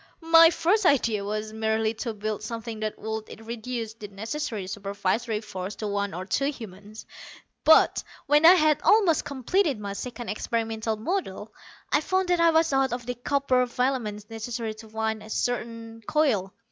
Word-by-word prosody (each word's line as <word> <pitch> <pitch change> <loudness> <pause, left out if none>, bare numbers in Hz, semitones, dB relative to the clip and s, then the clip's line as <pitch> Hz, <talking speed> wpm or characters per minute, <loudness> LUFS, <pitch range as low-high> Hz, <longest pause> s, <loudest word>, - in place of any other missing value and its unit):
"My 330 0 +9
first 355 +6 +1
idea 230 - +2
was 215 +1 -4
merely 220 0 0
to 230 +1 -4
build 215 0 -3
something 225 0 -6
that 215 0 -3
would 220 0 -6
reduce 230 -1 -5
the 215 -2 -9
necessary 220 +1 -4
supervisory 200 +3 -2
force 200 -2 -6
to 215 - -6
one 200 -3 -2
or 185 +2 -5
two 255 +8 0
humans. 215 -5 -10 0.6
But, 315 - +5 0.2
when 295 +2 +4
I 345 +3 +10
had 310 -3 +3
almost 395 -7 +4
completed 280 - 0
my 200 -1 -5
second 240 +3 -6
experimental 225 0 -2
model, 220 - -3 0.4
I - - +4
found 375 -1 0
that 355 -1 +3
I 335 0 +5
was 320 -2 +3
out 270 -2 +2
of 245 -1 -4
the 245 - -2
copper 255 0 +1
filaments 240 -5 -2
necessary 225 0 -4
to 220 +1 -13
wind 220 0 -2
a 215 - -12
certain 230 -1 -3
coil. 250 -12 +1
225 Hz, 165 wpm, -26 LUFS, 215-270 Hz, 0.6 s, I